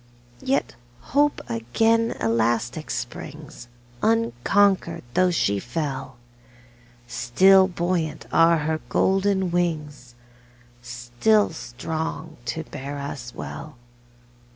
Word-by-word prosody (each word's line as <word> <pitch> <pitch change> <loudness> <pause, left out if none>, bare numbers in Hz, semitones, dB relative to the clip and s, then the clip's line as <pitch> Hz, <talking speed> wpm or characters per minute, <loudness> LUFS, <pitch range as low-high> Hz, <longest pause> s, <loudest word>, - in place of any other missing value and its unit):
Yet 270 +1 0 0.4
Hope 290 +1 +3
again 225 - +1
elastic 120 +5 0
springs, 140 0 -6 0.3
Unconquered, 165 - +2
though 185 0 +4
she 100 - +1
fell; 130 +1 -4 0.9
Still 190 +12 +5
buoyant 170 -4 -2
are 165 0 +5
her 155 +1 -1
golden 190 -1 +2
wings, 150 -8 -2 0.7
Still 120 - +1
strong 160 +4 -5
to 160 +6 -3
bear 140 -1 -7
us 135 -4 -6
well. 155 -2 -7
155 Hz, 85 wpm, -24 LUFS, 120-180 Hz, 0.9 s, Still